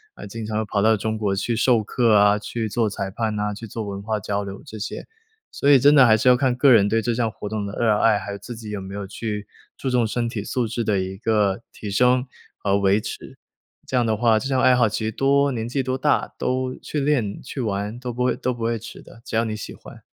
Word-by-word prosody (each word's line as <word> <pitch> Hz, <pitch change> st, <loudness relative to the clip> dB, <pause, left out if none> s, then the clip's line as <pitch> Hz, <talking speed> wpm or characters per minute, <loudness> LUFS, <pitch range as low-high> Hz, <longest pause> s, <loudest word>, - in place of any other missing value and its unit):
呃， -, -, -9 dB
经 110 Hz, +3 st, -7 dB
常 110 Hz, 0 st, -1 dB
跑 105 Hz, -1 st, -1 dB
到 110 Hz, +1 st, +4 dB
中 110 Hz, +2 st, -2 dB
国 105 Hz, -3 st, -1 dB
去 115 Hz, +4 st, -1 dB
授 120 Hz, -1 st, +3 dB
课 115 Hz, +1 st, +2 dB
啊， 105 Hz, 0 st, +5 dB
去 115 Hz, +2 st, -4 dB
做 110 Hz, +1 st, 0 dB
裁 95 Hz, -1 st, -4 dB
判 110 Hz, 0 st, -2 dB
呐， 105 Hz, 0 st, -1 dB
去 115 Hz, +3 st, -8 dB
做 110 Hz, +2 st, -5 dB
文 100 Hz, -1 st, -5 dB
化 110 Hz, +1 st, -2 dB
交 100 Hz, +1 st, -2 dB
流 100 Hz, 0 st, -8 dB
这 110 Hz, -, -9 dB
些。 105 Hz, -, -5 dB, 0.5 s
所 140 Hz, -, 0 dB
以 140 Hz, -, +8 dB
真 145 Hz, +3 st, +5 dB
的 135 Hz, -4 st, +7 dB
还 110 Hz, -1 st, +5 dB
是 110 Hz, -, 0 dB
要 125 Hz, -, +8 dB
看 130 Hz, -1 st, +1 dB
个 135 Hz, +2 st, +5 dB
人 105 Hz, -4 st, +5 dB
对 115 Hz, +1 st, +1 dB
这 120 Hz, -, 0 dB
项 115 Hz, -1 st, 0 dB
活 105 Hz, -, -7 dB
动 105 Hz, -1 st, -3 dB
的 100 Hz, -, -7 dB
热 115 Hz, -3 st, +3 dB
爱， 110 Hz, -2 st, +4 dB
还 100 Hz, -, -6 dB
有 100 Hz, -, -5 dB
自 120 Hz, +4 st, -8 dB
己 110 Hz, -2 st, -8 dB
有 105 Hz, -2 st, -4 dB
没 95 Hz, +1 st, -8 dB
有 100 Hz, -1 st, -4 dB
去 105 Hz, +1 st, -5 dB, 0.3 s
注 130 Hz, -, -3 dB
重 120 Hz, -2 st, +2 dB
身 120 Hz, +2 st, -1 dB
体 110 Hz, -3 st, -4 dB
素 120 Hz, +2 st, -1 dB
质 115 Hz, +2 st, -2 dB
的 105 Hz, -2 st, +1 dB
一 95 Hz, +1 st, -4 dB
个 105 Hz, -1 st, +1 dB
提 105 Hz, -, -7 dB
升 125 Hz, +4 st, +3 dB, 0.3 s
和 100 Hz, 0 st, +1 dB
维 100 Hz, +1 st, +3 dB
持， -, -, -8 dB, 0.5 s
这 -, -, -4 dB
样 125 Hz, -, +3 dB
的 110 Hz, -2 st, 0 dB
话 110 Hz, -1 st, +3 dB
这 135 Hz, -, -4 dB
项 130 Hz, -1 st, +1 dB
爱 130 Hz, -1 st, +5 dB
好 120 Hz, -3 st, +3 dB
其 110 Hz, -, -3 dB
实 110 Hz, -, -1 dB
多 140 Hz, +3 st, +2 dB
年 115 Hz, -3 st, -3 dB
纪 135 Hz, +2 st, -1 dB
多 130 Hz, 0 st, -1 dB
大 145 Hz, +3 st, 0 dB
都 130 Hz, 0 st, -1 dB
去 150 Hz, -, -3 dB
练、 135 Hz, -8 st, 0 dB
去 130 Hz, 0 st, -5 dB
玩 105 Hz, +1 st, -3 dB
都 125 Hz, -1 st, -4 dB
不 125 Hz, +1 st, -2 dB
会 125 Hz, -, +2 dB
都 125 Hz, -1 st, -2 dB
不 115 Hz, -, -6 dB
会 115 Hz, 0 st, 0 dB
迟 110 Hz, -, -11 dB
的， 115 Hz, -, -16 dB
只 -, -, -6 dB
要 115 Hz, -, +2 dB
你 110 Hz, -1 st, -3 dB
喜 105 Hz, -, -7 dB
欢。 -, -, -14 dB
110 Hz, 290 characters per minute, -23 LUFS, 105-125 Hz, 0.5 s, 以